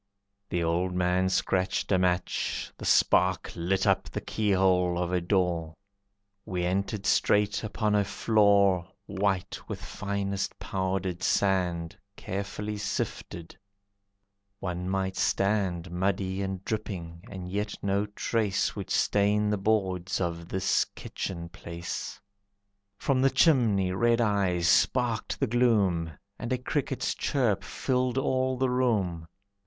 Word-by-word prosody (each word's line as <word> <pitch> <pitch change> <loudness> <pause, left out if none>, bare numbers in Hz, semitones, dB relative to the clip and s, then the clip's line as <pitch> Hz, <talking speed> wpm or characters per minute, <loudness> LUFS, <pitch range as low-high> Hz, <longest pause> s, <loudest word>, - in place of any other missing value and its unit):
The 85 -1 0
old 90 +2 0
man 90 +1 +2
scratched 95 +1 0
a 95 - +4
match, 90 0 -1
the - - -9
spark 95 0 +3
Lit 95 +3 0
up - - +2
the - - -4
keyhole 95 -4 +2
of 90 0 -1
a 90 - +2
door, 85 -3 0 0.7
We 90 -1 -3
entered 100 +3 -1
straight 105 0 +2
upon 110 0 -1
a 105 -1 +4
floor 100 -4 +3 0.2
White 100 -2 -1
with - - -4
finest 100 -1 -3
powdered 95 -2 -2
sand 90 -4 +1 0.2
Carefully 105 +3 -4
sifted, 100 -4 -4 1.0
one 90 -1 -3
might 95 0 -1
stand 95 -4 0
Muddy 95 +1 -1
and 95 -1 -4
dripping, 95 -6 -4
and 95 -3 -7
yet 105 +3 -2
no 100 +1 +1
trace 105 -1 -1
Would - - -6
stain 105 +1 +2
the 105 - +1
boards 95 -3 0
of 85 -1 -3
this 95 0 +2
kitchen 85 -3 -6
place. 85 0 -6 0.8
From 130 +3 +1
the 135 - +5
chimney, 120 - +3
red 115 +5 +2
eyes 100 -6 +1
sparked 120 +5 +2
the 135 - +2
gloom, 105 -9 +2 0.3
And 120 - -4
a 130 - +2
cricket's 135 +1 -2
chirp 110 -8 0
filled 125 +4 -1
all 130 -1 +1
the 130 0 +1
room. 100 -10 0
95 Hz, 125 wpm, -28 LUFS, 90-105 Hz, 1.0 s, the